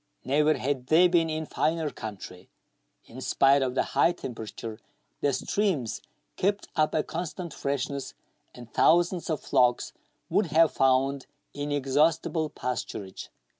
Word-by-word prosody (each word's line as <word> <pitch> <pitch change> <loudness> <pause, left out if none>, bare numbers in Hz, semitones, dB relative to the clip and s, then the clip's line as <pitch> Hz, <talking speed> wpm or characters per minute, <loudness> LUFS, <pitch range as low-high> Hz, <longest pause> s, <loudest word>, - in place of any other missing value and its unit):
Never 150 +3 +3
had 130 -1 -2
they 170 +5 +6
been 170 -2 +2
in 155 0 -3
finer 155 0 -1
country. 95 -4 -9 0.6
In - - -11
spite 140 +1 +3
of 130 -1 -1
the - - +2
high 170 - +4
temperature, 115 -5 -7 0.4
the 145 - +1
streams 155 - -1 0.4
kept 200 +2 0
up 155 -1 +1
a 155 - +2
constant 170 0 -5
freshness, 140 0 -3 0.4
and 120 -2 -12
thousands 175 +1 +3
ot 155 -4 -1
flocks 125 -1 +2 0.3
would 205 - +1
have 160 +1 +4
found 135 +1 +1 0.3
inexhaustible 145 +3 0
pasturage. 105 -8 -5
145 Hz, 130 wpm, -27 LUFS, 130-165 Hz, 0.6 s, they